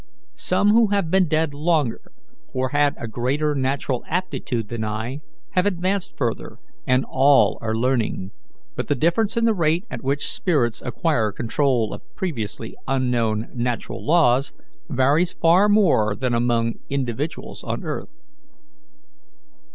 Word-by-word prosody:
Some 190 +3 +2
who 225 0 +5
have 200 -5 0
been 190 -1 +4
dead 155 -1 +1
longer, 150 -5 0 0.5
or 130 0 0
had 145 +1 +2
a 115 - -5
greater 135 +7 0
natural 135 -2 -1
aptitude 130 - -2
than 115 -2 -3
I, 110 +6 -4 0.3
have 180 +2 +2
advanced 190 0 -1
further, 120 -4 -3 0.3
and 130 +1 +3
all 135 +1 +4
are 110 -1 -1
learning; 115 -5 0 0.4
but - - -3
the 145 - +1
difference 185 - +1
in 230 - +3
the 225 - +4
rate 170 0 +1
at - - -5
which 140 +2 0
spirits 135 -11 0
acquire 120 -4 0
control 120 0 0
of - - -8
previously 115 - -4
unknown 120 -4 0
natural 120 -1 -3
laws 140 -5 +3 0.4
varies 145 +7 +2
far 180 +5 +4
more 160 - +3
than 125 0 -1
among 115 -1 +1
individuals 140 +2 -3
on - - -4
earth. - - -6
135 Hz, 135 wpm, -22 LUFS, 120-170 Hz, 0.5 s, who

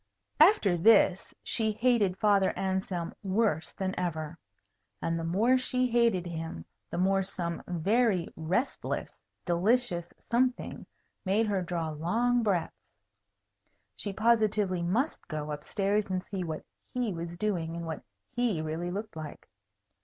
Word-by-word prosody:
After 305 - +6
this, 190 0 +4
she 220 -2 +1
hated 220 -5 +2
Father 200 -2 +3
Anselm 190 -3 -2
worse 190 -5 0
than 190 -1 -3
ever. 160 -3 -3 0.6
And 165 0 -1
the - - -3
more 220 +10 +3
she 255 0 +1
hated 230 -7 +2
him, 160 - -5 0.2
the - - -4
more 195 +2 +3
some 175 -3 -4
very 190 +2 +2
restless 180 - -2 0.3
delicious 180 0 +1 0.2
something 250 +2 0 0.4
made 205 +4 +2
her 200 -3 0
draw 170 -2 -2
long 230 +11 +1
breaths. 195 -7 -2 1.0
She 200 - -4
positively 215 -4 +2
must 225 - -1
go 150 -2 -4
up 150 0 -5
stairs 205 0 0
and 185 -1 -2
see 190 -2 -4
what 160 -2 -5 0.3
He 245 -5 0
was 170 0 -6
doing 175 -5 -1
and 170 0 -5
what 160 -1 -5 0.3
He 240 -8 0
really 160 +3 -3
looked 205 +1 -5
like. 155 -2 -8
190 Hz, 135 wpm, -29 LUFS, 170-220 Hz, 1.0 s, After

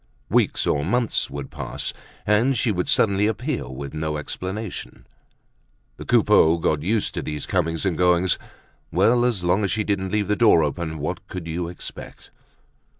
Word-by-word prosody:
Weeks 120 -4 +2
or 70 - +1
months 120 +7 0
would 70 -1 -7
pass - - -4 0.3
and 115 +6 +3
she 110 0 +2
would 90 -3 -1
suddenly 100 -1 +3
appear 115 - -2
with 70 +2 -7
no 75 -1 -2
explanation. 95 +7 -6 0.9
The - - -8
Coupeaus 80 +1 +4
got 75 -2 +1
used 105 +6 0
to - - -3
these 75 -2 -4
comings 80 -1 -1
and 95 -4 +1
goings. 90 +1 +3 0.5
Well, 115 +8 +3
as 115 -7 0
long 90 +4 +2
as 100 - +1
she 110 +4 0
didn't 95 -2 -1
leave 105 -2 0
the 105 - +2
door 105 -8 +5
open. 80 +2 -3
What 75 +1 -4
could 90 -3 -6
you 85 +1 -3
expect? 85 - -9
90 Hz, 165 wpm, -23 LUFS, 80-105 Hz, 0.9 s, door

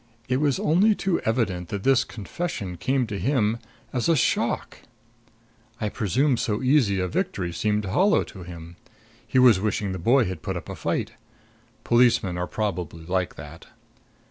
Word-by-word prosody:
It 130 - +1
was 140 -2 +1
only 200 +7 +3
too 190 -4 0
evident 100 -7 -1
that 100 -1 -4
this 135 -2 +4
confession 105 - -5
came 130 +8 0
to 105 -3 -5
him 115 -4 +1 0.3
as 125 +4 0
a 165 - +5
shock. 130 - 0 1.0
I 105 - -1
presume 125 - +1
so 110 +2 -1
easy 125 -8 +3
a 90 - 0
victory 90 0 -2
seemed 105 +3 0
hollow 185 - +3
to 95 - -11
him; 85 -1 -10 0.5
he - - 0
was 125 -6 +6
wishing 100 -1 -1
the 95 - -4
boy 120 +8 +4
had 90 -3 -5
put - - -3
up - - -8
a - - -5
fight. - - -2 0.7
Policemen 120 -6 +3
are 90 0 -2
probably 90 -6 -4
like 90 0 -1
that. 75 +3 -11
105 Hz, 165 wpm, -25 LUFS, 90-130 Hz, 1.0 s, was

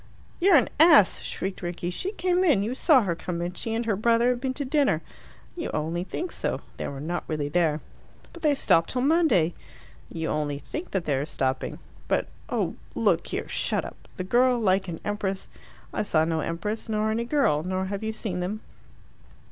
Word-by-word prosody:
"You're 375 0 +6
an 260 - +5
ass!" 305 - +7
shrieked 190 0 -4
Rickie. 175 0 -3
"She 370 - -2
came 365 -2 +1
in. 285 - +4
You 225 +4 -2
saw 265 -1 +5
her 180 -4 0
come 170 0 -4
in. 175 +1 -3
She 225 +5 -3
and 230 +1 -1
her 220 -3 +1
brother 230 +3 +3
have 245 -1 -3
been 260 -1 -2
to 285 - -2
dinner." 285 +1 +2 0.5
"You 335 - -4
only 165 +3 -1
think 345 - -4
so. - - -2 0.2
They - - -3
were 140 - -6
not 170 +5 -3
really 150 -2 -2
there." 160 -1 +1 0.5
"But 340 - -11
they 300 -2 +3
stop 165 -10 +3
till 250 -1 -1
Monday." 275 - +3 0.6
"You 160 -1 -3
only 150 -2 -1
think 310 - -6
that 190 -3 -2
they 145 - +1
are 140 - -1
stopping." 130 -3 -2 0.3
"But - - 0 0.2
oh, - - -1 0.2
look - - +2
here, - - -3
shut - - -1
up! - - -11
The 185 - -2
girl 245 +6 +3
like 190 -3 +2
an 165 -2 -5
empress 200 -2 -2 0.2
" - - -25
"I - - 0
saw 160 -6 +2
no 160 -1 0
empress, 210 +9 -3
nor 215 0 +1
any 230 +2 -1
girl, 235 - +2
nor 185 +2 -2
have 195 +1 -4
you 220 0 -2
seen 210 -5 -4
them." 195 +5 -3
200 Hz, 205 wpm, -26 LUFS, 170-255 Hz, 0.6 s, ass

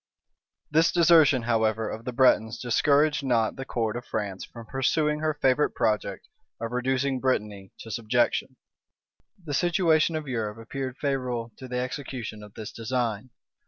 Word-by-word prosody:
This 160 +2 +4
desertion, 160 -7 +5
however, 110 -1 +1
of 110 +1 -6
the 125 - -2
Bretons 120 -3 +3
discouraged 145 +5 +2
not 115 -4 +1
the 135 - -6
court 115 -4 -2
of 120 - -4
France 100 -5 -4
from 115 -1 -11
pursuing 150 +5 0
her 155 -1 0
favorite 145 0 +2
project 105 -1 -1 0.3
of 115 0 -4
reducing 130 +2 0
Brittany 105 -7 -2
to 115 - -9
subjection 120 +3 0 0.9
The 145 - -4
situation 165 0 +2
of 155 -2 -4
Europe 110 -4 -3
appeared 130 +3 -5
favorable 125 -5 -2
to 130 - -9
the 125 0 -3
execution 125 -4 -5
of 105 -1 -13
this 110 -1 -7
design. 115 -1 -2
125 Hz, 150 wpm, -26 LUFS, 115-140 Hz, 0.9 s, desertion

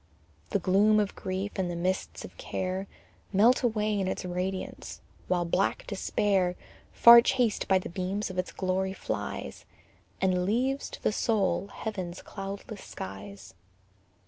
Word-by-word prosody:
The - - +1
gloom 210 +3 +4
of 205 -2 0
grief, 190 +2 -3
and 185 -2 0
the 175 - -3
mists 185 +2 -2
of - - -12
care 190 - -3 0.4
Melt 220 +6 +5
away 215 -4 +1
in 190 - 0
its 185 - -3
radiance, 185 +1 -4 0.3
while 175 -1 +1
black 185 +3 0
despair, 190 -2 0 0.4
Far 235 0 +9
chased 240 -3 +1
by 190 - +5
the 185 - -4
beams 190 +3 -3
of 185 - -4
its 180 - -2
glory, 190 0 -1
flies, - - -5 0.6
And 185 -1 +2
leaves 255 +8 0
to - - -10
the - - +3
soul 200 -5 +1
heaven's 190 -5 -5
cloudless 200 +1 -7
skies. 95 0 -8
190 Hz, 145 wpm, -29 LUFS, 185-210 Hz, 0.6 s, Far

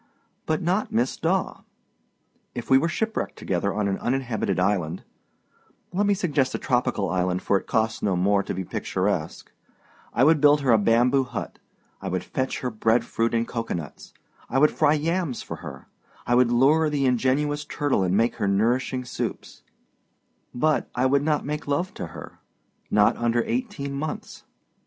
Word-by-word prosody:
But 155 +1 0
not 185 +5 0
Miss 120 +3 +1
Daw. - - -1 0.9
If 120 +1 -6
we 135 - +7
were 160 - +1
shipwrecked 220 +5 -2
together 95 +2 -1
on 105 0 -1
an 95 -1 -1
uninhabited 120 -7 -1
island 90 -3 0 0.9
let 200 +3 +1
me 205 - +3
suggest 145 -9 0
a - - 0
tropical 125 -5 0
island, 90 0 -1
for 100 - +2
it - - -18
costs 110 0 0
no 100 -3 +1
more 100 +3 +2
to - - -4
be 95 - -3
picturesque - - -2 0.6
I 125 - +2
would 155 +1 +5
build 145 0 +5
her 135 -3 +2
a 110 - +5
bamboo 120 +5 +3
hut, 125 - -6 0.4
I 95 - -5
would 90 0 -2
fetch 130 0 -3
her 125 - -2
bread 110 +2 +1
fruit 115 +1 -1
and 115 0 0
cocoanuts, 115 -10 -5 0.4
I 135 - 0
would 150 +3 +5
fry 155 -3 +3
yams 160 -3 -1
for - - -7
her, - - -10 0.4
I 120 - +1
would 120 -1 +4
lure 150 +6 +4
the 145 -2 0
ingenuous 135 +4 +1
turtle 145 -6 0
and 95 +1 +1
make 115 +2 +1
her 100 - 0
nourishing 120 +5 +1
soups, 120 - -5 0.9
but 155 +5 0
I 125 - +1
wouldnât 140 +3 +2
make 150 +1 -4
love 160 +6 -1
to - - -6
her 80 - -11 0.5
not 105 -1 +4
under 120 0 +1
eighteen 205 - -3
months. 150 +2 -5
125 Hz, 170 wpm, -25 LUFS, 110-150 Hz, 0.9 s, we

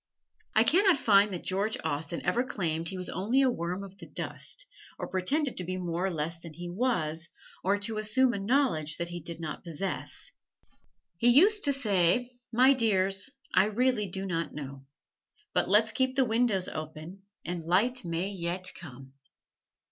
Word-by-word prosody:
I - - +6
can 375 +5 +4
not 375 -6 +5
find 205 -4 +4
that 180 - -5
George 200 +4 -1
Austen 160 +1 -3
ever 245 - +2
claimed 165 -9 -2
he 190 - -5
was 180 - -3
only 235 +8 +1
a 260 - +3
worm 180 -1 -3
of 195 0 -12
the - - -10
dust, - - -6 0.3
or - - -4
pretended 260 +10 0
to 180 - -2
be 185 +1 -4
more 175 0 -2
or - - 0
less 165 0 -3
than 165 -2 -11
he 175 0 -6
was, 175 -7 -1 0.3
or 200 +2 +2
to 215 +1 -1
assume 245 +4 +3
a 200 - -3
knowledge 195 - +1
that 170 0 -3
he 175 0 -5
did 170 +1 -6
not 160 -2 -6
possess. 175 +3 -5 0.9
He 235 - +2
used 395 - +5
to 285 - +3
say: 240 -2 +2 0.2
"My 255 +4 +6
dears, 200 -3 +1 0.2
I 190 - +5
really 225 -1 +1
do 190 +2 -4
not 165 -4 -3
know. 135 -2 -8 0.7
But - - +1
let's 215 +3 +5
keep 260 +1 0
the 265 -1 +4
windows 225 -5 +1
open 155 +4 -7 0.2
and 175 -1 -4
light 210 +9 +1
may 170 +2 -2
yet 185 -1 -3
come." 135 -4 -11
190 Hz, 180 wpm, -29 LUFS, 170-240 Hz, 0.9 s, I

